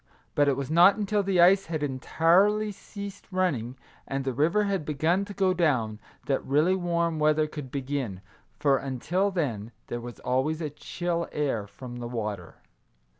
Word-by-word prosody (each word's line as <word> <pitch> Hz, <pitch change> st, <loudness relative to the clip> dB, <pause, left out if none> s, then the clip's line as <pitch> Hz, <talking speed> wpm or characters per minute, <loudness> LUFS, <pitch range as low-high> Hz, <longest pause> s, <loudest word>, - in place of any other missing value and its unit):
But 145 Hz, -1 st, +3 dB
it 140 Hz, -, +2 dB
was 140 Hz, +1 st, -4 dB
not 175 Hz, +4 st, +7 dB
until 210 Hz, -1 st, 0 dB
the 195 Hz, -2 st, 0 dB
ice 190 Hz, +3 st, +6 dB
had 160 Hz, -2 st, -3 dB
entirely 175 Hz, +10 st, +2 dB
ceased 200 Hz, 0 st, -9 dB
running, 135 Hz, -10 st, -1 dB, 0.3 s
and 135 Hz, 0 st, -3 dB
the 130 Hz, -, -1 dB
river 165 Hz, -, +2 dB
had 195 Hz, -5 st, -1 dB
begun 160 Hz, +6 st, +1 dB
to 205 Hz, -, -8 dB
go 190 Hz, -2 st, +2 dB
down, 125 Hz, -12 st, +1 dB, 0.3 s
that 135 Hz, -, 0 dB
really 150 Hz, +7 st, +3 dB
warm 170 Hz, -3 st, 0 dB
weather 155 Hz, 0 st, +3 dB
could 150 Hz, -3 st, -7 dB
begin, 130 Hz, -8 st, -3 dB, 0.4 s
for, 140 Hz, -2 st, +3 dB
until 155 Hz, +9 st, -1 dB
then, 120 Hz, -, -2 dB, 0.2 s
there 120 Hz, -, -3 dB
was 120 Hz, 0 st, -9 dB
always 135 Hz, +5 st, 0 dB
a 155 Hz, -3 st, -3 dB
chill 170 Hz, +3 st, -3 dB
air 130 Hz, -9 st, -1 dB
from 120 Hz, +3 st, -9 dB
the 120 Hz, -1 st, -5 dB
water. 105 Hz, -7 st, -4 dB
155 Hz, 170 wpm, -27 LUFS, 130-185 Hz, 0.4 s, not